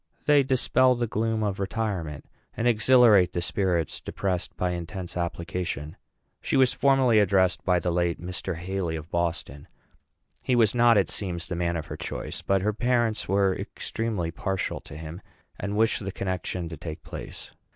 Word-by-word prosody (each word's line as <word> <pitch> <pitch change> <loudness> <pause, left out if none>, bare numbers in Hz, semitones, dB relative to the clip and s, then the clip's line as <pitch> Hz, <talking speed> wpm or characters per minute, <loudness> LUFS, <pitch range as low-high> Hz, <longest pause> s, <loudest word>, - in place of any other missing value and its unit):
They 145 -1 +6
dispel 130 -1 +3
the 120 0 -1
gloom 110 0 -1
of 100 -2 -2
retirement, 95 -7 -3 0.3
and 120 - +1
exhilarate 115 -4 +5
the - - -1
spirits 90 -4 -1
depressed 95 -2 -3
by 90 -1 0
intense 90 +1 -5
application. 85 -3 -3 0.5
She - - 0
was 130 -2 +4
formerly 135 -5 +4
addressed 95 -3 +3
by 90 -1 +3
the 90 - -1
late 85 -1 0
Mr. 90 +1 -4
Haly, 90 -1 -3
of 80 +1 -8
Boston. 85 -5 -2 0.7
He 125 - +1
was 110 -4 +4
not, 120 -2 +5
it 100 - +2
seems, 90 -4 -3
the 90 - -4
man 85 0 0
of 80 - -4
her - - -7
choice; - - -5
but 95 -1 +1
her 105 +1 +1
parents 120 -2 0
were 100 0 +3
extremely 105 -8 -3
partial 95 +1 -2
to 75 - -11
him, 80 +3 -8 0.4
and 100 +1 -3
wished 110 -1 +2
the 95 - -3
connection 95 -2 -3
to 80 - -7
take 80 -1 -7
place. - - -8
95 Hz, 170 wpm, -26 LUFS, 85-110 Hz, 0.7 s, They